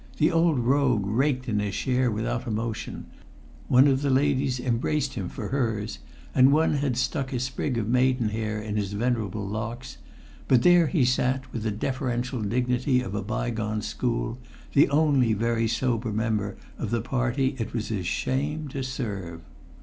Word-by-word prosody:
The 155 +1 +3
old 165 -3 +3
rogue 125 -3 +2
raked 130 +4 0
in 105 -3 0
his 100 -2 -2
share 130 -1 +1
without 115 +2 -2
emotion; 110 -1 -3 0.6
one 130 +3 +6
of 135 -1 +2
the 145 - 0
ladies 135 -1 +2
embraced 130 +4 0
him 95 -6 -4
for - - -6
hers; 110 - -1 0.3
and 130 +1 +6
one 155 +2 +3
had 135 -4 -1
stuck 130 +1 -1
a 125 - -1
sprig 130 +1 -2
of 110 -3 -1
maidenhair 115 -4 +1
in 105 0 -4
his 100 -1 -2
venerable 110 -3 -1
locks; 115 +4 -5 0.5
but 125 -2 +4
there 175 -2 +6
he 145 -5 +2
sat, 130 +1 0
with 115 - -3
the 110 - -1
deferential 125 +2 -2
dignity 125 +4 +1
of 110 -6 -5
a 105 - -1
bygone 110 0 -2
school, 120 0 -2 0.3
the 145 - +5
only 140 -6 +3
very 115 +1 +1
sober 115 -1 0
member 105 -2 -1 0.2
of - - -3
the 115 -1 0
party 130 +2 0
it 115 - -3
was 115 -2 -3
his 95 -6 -2
shame 150 +7 -1
to 135 +1 -4
serve. 100 -10 -4
125 Hz, 165 wpm, -26 LUFS, 110-130 Hz, 0.6 s, one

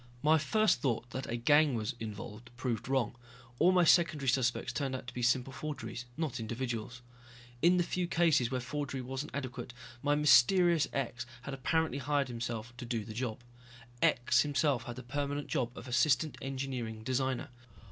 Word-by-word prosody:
My 155 +1 +5
first 215 - +2
thought 120 -2 -1
that 130 +1 -4
a 120 - -1
gang 145 +3 +4
was 110 -2 -2
involved 110 +2 -7
proved 120 -2 -2
wrong. 130 -4 0 0.4
All 175 +3 +6
my 180 -1 +4
secondary 160 -5 +4
suspects 125 -1 +1
turned 135 -3 -2
out 130 - -6
to 120 - -8
be 125 - -4
simple 125 +2 +1
forgeries, 145 -4 -5
not 155 -7 -2
individuals. 120 +1 -4 0.6
In 180 +1 +5
the 175 - +3
few 180 +1 -2
cases 160 -8 +3
where 130 -1 -1
forgery 135 0 -4
wasn't 135 +4 -5
adequate, 130 -2 -5 0.3
my 145 0 +2
mysterious 160 +3 +5
X 120 -2 -3 0.2
had 140 - -5
apparently 140 +1 0
hired 140 0 0
himself 120 -1 -5
to 125 - -7
do 115 -3 -2
the 110 - -7
job. 115 0 -3 0.6
X 120 - +3
himself 140 -4 +1
had 120 - -6
the 130 - -8
permanent 145 +3 -3
job 125 -1 -1
of - - -8
Assistant 135 +3 +2
Engineering 130 -5 -4
Designer. 130 +1 -1
130 Hz, 170 wpm, -32 LUFS, 120-145 Hz, 0.6 s, All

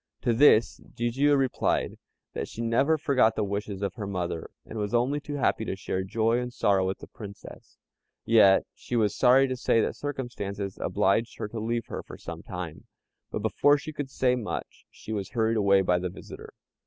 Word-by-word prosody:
To 120 - +2
this 115 -2 +5
Jijiu 135 +5 +2
replied, 135 -2 0 0.3
that - - -3
she 115 - -6
never 135 +7 +2
forgot 130 -6 +3
the 110 - 0
wishes 100 0 -4
of 100 - -1
her 105 -5 -6
mother, 90 -4 -3 0.2
and 110 - -7
was 105 +3 -1
only 130 +5 +1
too 145 0 -6
happy 130 -5 +1
to - - -3
share 95 -1 -3
joy 115 +4 +1
and 125 0 -4
sorrow 100 -5 +2
with 95 - -2
the - - -11
Princess; 100 -3 -11 0.5
yet 105 -4 +6
she 125 - -6
was 110 -3 +2
sorry 130 +2 +5
to 130 - -2
say 120 -2 +2
that - - 0
circumstances 105 -9 -5
obliged 110 +4 +1
her - - -3
to 115 - -5
leave 115 +1 -2
her - - -6
for - - -11
some - - -8
time; - - -7 0.4
but - - -4
before 145 0 +4
she 155 +2 -7
could 145 -2 -5
say 125 -1 +1
much, 120 -4 -6
she 110 - -8
was 100 -3 -3
hurried 115 -1 +1
away 100 -2 +4
by 90 -1 +2
the 90 0 -3
visitor. - - -11
115 Hz, 195 wpm, -27 LUFS, 100-125 Hz, 0.5 s, yet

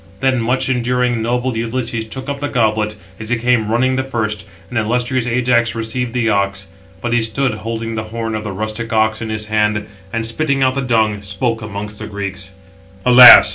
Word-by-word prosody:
Then 130 -2 +1
much 125 +3 0
enduring, 125 -1 0
noble 125 +2 -1
Ulysses 115 0 -2
took 130 +5 -7
up 140 -1 -3
the 145 - -2
goblet, 110 -3 +1 0.2
as 110 0 -6
he 120 - +2
came 115 -2 +1
running 130 +3 +2
the 130 - 0
first; 110 -6 -3 0.3
and 120 - 0
illustrious 125 +2 0
Ajax 120 -1 +1
received 115 +2 -3
the 120 -2 0
ox. 100 -2 0 0.4
But 120 -1 -2
he 120 - +3
stood, 115 +3 0
holding 115 +1 -4
the 110 -1 -3
horn 115 0 -4
of 110 0 -3
the 105 - -4
rustic 110 +4 -4
ox 110 0 +1
in 110 - -4
his 110 -1 -2
hands; 105 -1 0 0.2
and, 115 0 -1
spitting 140 +3 0
out 130 0 +3
the 135 - -2
dung, 110 -5 +1
spoke 110 +4 -2
amongst 105 0 -6
the - - -6
Greeks: 100 -1 -5 0.6
"Alas! 125 0 +10
115 Hz, 195 wpm, -17 LUFS, 110-125 Hz, 0.6 s, Alas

